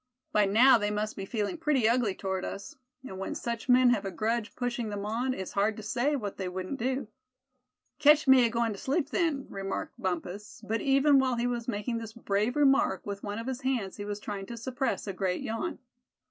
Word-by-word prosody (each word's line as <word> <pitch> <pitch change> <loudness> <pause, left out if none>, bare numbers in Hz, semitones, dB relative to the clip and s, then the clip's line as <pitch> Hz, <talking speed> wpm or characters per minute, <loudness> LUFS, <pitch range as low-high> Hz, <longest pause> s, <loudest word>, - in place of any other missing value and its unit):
By 210 -1 +4
now 235 +5 +6
they 205 -1 0
must 210 +1 -2
be 195 - -5
feeling 215 - -2
pretty 295 -8 +2
ugly 230 -4 +2
toward 190 -1 -3
us; 200 - -6 0.3
and 190 -8 -8
when 195 - -4
such 235 +1 -4
men 250 0 +6
have 220 -5 +1
a 195 - -3
grudge 225 +2 -2
pushing 240 -2 -2
them 205 -1 -4
on, 245 +4 -1
it's 190 - -5
hard 205 +2 +1
to 220 - -7
say 255 +6 0
what 210 -7 -4
they 190 -2 -3
wouldn't 185 +8 -5
do." 260 +1 -1 0.9
"Ketch 300 0 +6
me 265 -1 +7
agoin' 230 0 0
to 200 - -7
sleep 285 +3 -1
then," 310 -6 0
remarked 195 0 -5
Bumpus; 185 +3 -4
but 225 +1 -1
even 275 +1 +4
while 260 -2 +1
he 235 0 -1
was 240 -1 -2
making 230 +1 -2
this 225 -1 -8
brave 215 +1 -1
remark, 280 -1 +3
with 200 -1 -5
one 205 0 -4
of 230 - -5
his 260 0 -4
hands 250 -8 -1
he 205 - -5
was 205 0 -4
trying 200 -2 -5
to 235 - -7
suppress 260 +2 -2
a 195 - -4
great 185 -1 -1
yawn. 225 +10 -3
230 Hz, 215 wpm, -29 LUFS, 205-260 Hz, 0.9 s, me